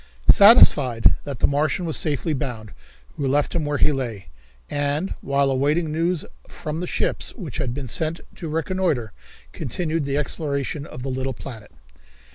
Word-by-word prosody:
Satisfied 145 - +6
that 140 -5 -6
the - - +4
Martian 155 +5 0
was 160 - -1
safely 155 +1 0
bound, 120 -7 -4 0.5
we 140 - -1
left 145 +2 +1
him 165 -3 -1
where 145 0 -1
he 150 - +3
lay, 115 - -4 0.4
and, 145 +5 -1
while 140 0 +1
awaiting 150 +5 +1
news 165 +1 0 0.2
from 155 +1 -5
the 180 - -3
ships - - -1
which 175 - -7
had 135 -5 -1
been 135 +1 -5
sent 160 +7 -1 0.2
to 165 - -6
reconnoitre, 160 - -1 0.4
continued 165 - -2
the 140 0 -1
exploration 145 -1 -2
of 125 - -9
the 135 - -3
little 130 0 -2
planet. 110 -4 -10
145 Hz, 160 wpm, -23 LUFS, 130-160 Hz, 0.5 s, Satisfied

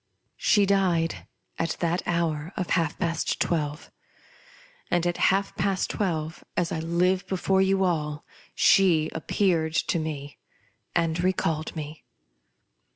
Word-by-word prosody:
She 205 -1 +4
died 185 -4 +1 0.3
at 165 - -1
that 170 +1 0
hour 165 0 -1
of 185 -3 -3
half 165 -3 +1
past 170 0 -1
twelve; 150 -2 -2 1.0
and 175 -1 +1
at 175 0 0
half 195 +1 0
past 190 0 0
twelve, 165 -5 -2
as 175 -2 0
I 160 - -2
five 180 +3 +1
before 190 0 +1
you 190 0 +2
all, 150 -4 -1 0.3
she 160 -1 +4
appeared 160 -1 0
to 170 - +1
me 145 -2 -5 0.6
and 170 0 +1
recalled 165 -4 0
me. 155 0 -7
170 Hz, 125 wpm, -26 LUFS, 160-185 Hz, 1.0 s, She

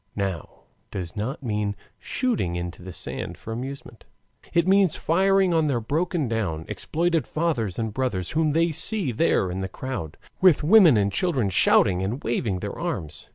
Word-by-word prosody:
now 95 -5 -4 0.3
does 90 -4 -6
not 125 +7 -4
mean 105 -3 -1 0.2
shooting 230 - -1
into 85 0 -5
the 90 +1 -8
sand - - -5
for 115 - -7
amusement, 125 -1 -7 0.5
it 170 +1 +2
means 195 -3 +4
firing 190 +2 +2
on 160 -2 +2
their 130 -5 +1
broken 155 +5 -1
down, 100 -9 -2
exploited 165 -3 -1
fathers 140 - -1
and 110 -2 -2
brothers 105 -9 -2
whom 155 -1 +1
they 165 +1 +2
see 160 - +1
there 110 - +1
in 95 +1 -4
the 95 - -3
crowd, 120 - -6 0.2
with 185 -6 +5
women 170 - +7
and 100 -1 +1
children 140 - 0
shouting 90 0 +4
and 110 +9 -3
waving 110 -5 -1
their - - -4
arms. 75 -2 -4
125 Hz, 165 wpm, -24 LUFS, 100-165 Hz, 0.5 s, women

